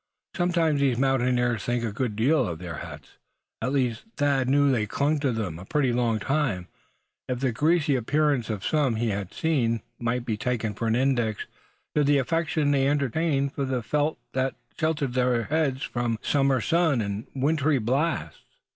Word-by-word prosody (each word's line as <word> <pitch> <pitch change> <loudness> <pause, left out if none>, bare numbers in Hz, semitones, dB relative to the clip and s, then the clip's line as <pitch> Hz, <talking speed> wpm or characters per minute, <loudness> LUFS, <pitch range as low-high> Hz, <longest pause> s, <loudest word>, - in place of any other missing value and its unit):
Sometimes 170 -5 +1
these 135 -4 +2
mountaineers 125 -4 +1
think 120 0 -1
a 115 - -1
good 110 0 -2
deal 130 +3 +2
of 85 - -4
the 85 0 -7
hats 75 -3 -10 0.4
they 115 - -1
wear; - - +1
at - - -3
least 125 -5 0
Thad 140 -3 +2
knew 140 0 +4
they 110 -4 0
clung 145 +7 0
to 140 -2 +1
them 100 -8 -3
a 90 - -10
pretty 135 +1 +1
long 120 -2 +1
time, 110 -7 -1 0.6
if 125 -1 -1
the 130 -1 +1
greasy 155 +3 +2
appearance 140 0 +1
of 105 -2 -3
some 145 -6 +1
he 115 +1 0
had 100 -2 -3
seen 120 -9 0 0.2
might 120 +1 -1
be 110 -3 -1
taken 115 -3 -1
for 115 +3 -3
an 110 - +2
index 120 -4 0 0.5
to 150 - +3
the 145 0 +4
affection 155 +1 +1
they 135 -1 +3
entertained 140 0 0
for 140 - -2
the 130 -3 -1
felt 150 +6 0 0.2
that 130 0 0 0.2
sheltered 150 -5 -1
their 125 -2 +2
heads 140 -2 0
from 120 -1 -1
the - - -10
summer 135 -3 +2
sun, 165 -4 +2
and 100 0 -3
the - - -5
wintry 150 +1 +2
blasts. 135 +8 -1
130 Hz, 190 wpm, -26 LUFS, 115-145 Hz, 0.6 s, knew